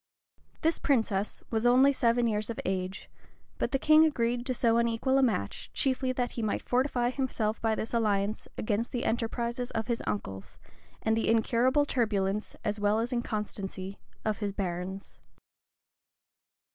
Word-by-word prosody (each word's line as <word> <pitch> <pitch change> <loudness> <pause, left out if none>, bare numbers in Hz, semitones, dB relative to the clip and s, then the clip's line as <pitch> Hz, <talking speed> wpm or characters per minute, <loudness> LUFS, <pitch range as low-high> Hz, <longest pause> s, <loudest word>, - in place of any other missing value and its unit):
This 325 +1 +1
princess 220 -7 0
was 220 -1 0
only 255 +3 +6
seven 240 -2 +2
years 215 -1 0
of 230 - -4
age; 185 0 -3 0.5
but - - 0
the 270 - +2
king 310 +3 +6
agreed 245 -5 +1
to 255 - +1
so 230 -1 +3
unequal 235 +3 +2
a - - +4
match, 220 - -1
chiefly 260 -1 +1
that 245 -1 -1
he 235 - -4
might 215 -2 -1
fortify 250 -1 +1
himself 245 -5 -1
by 225 -1 +1
this 220 - -4
alliance 210 -2 0
against 215 +2 -1
the 245 - -1
enterprises 235 +1 -1
of 225 -1 -2
his 235 -2 -1
uncles, 95 - -4 0.5
and 220 0 +2
the 225 - 0
incurable 245 +5 +3
turbulence, 210 -6 0
as 210 0 -1
well 205 +1 +2
as 235 +3 -1
inconstancy, 200 -4 -4 0.3
of 215 -2 0
his 205 -2 -1
barons. 190 0 -5
230 Hz, 155 wpm, -29 LUFS, 210-245 Hz, 0.5 s, only